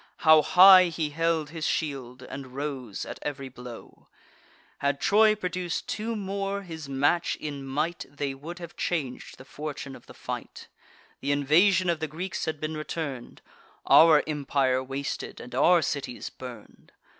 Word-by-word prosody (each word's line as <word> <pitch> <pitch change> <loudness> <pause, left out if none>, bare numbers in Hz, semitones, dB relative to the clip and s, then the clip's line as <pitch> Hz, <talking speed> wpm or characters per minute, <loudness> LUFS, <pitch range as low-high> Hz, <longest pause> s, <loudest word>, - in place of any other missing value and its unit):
How 155 -1 +8
high 185 +3 +8
he 160 -3 -2
held 165 -1 0
his 165 -2 -3
shield, 130 -5 -3
and 130 -1 -9
rose 135 -7 -4
at - - -8
ev'ry 140 -2 -5
blow! 125 -2 -12 0.7
Had 140 0 0
Troy 215 +1 +4
produc'd 180 -3 -3
two 225 +2 -3
more 200 0 -3
his 160 -5 -8
match 145 +5 +1
in 145 -2 -6
might, 150 +6 -2
They 145 -1 -3
would 155 +6 -9
have 170 -2 -9
chang'd 145 -8 -2 0.2
the 130 - -13
fortune 145 -2 -7
of - - -16
the - - -13
fight: - - -7 0.5
Th' - - -11
invasion 160 +7 +3
of 170 -2 +1
the 160 - -2
Greeks 175 +5 -4
had 160 -2 -3
been 155 +1 -3
return'd, 155 -4 -6 0.4
Our 160 -2 +7
empire 140 -3 0
wasted, 135 +2 -5
and 125 - -10
our 165 +6 +4
cities 135 -3 -4
burn'd. 125 -4 -12
150 Hz, 155 wpm, -27 LUFS, 135-170 Hz, 0.7 s, How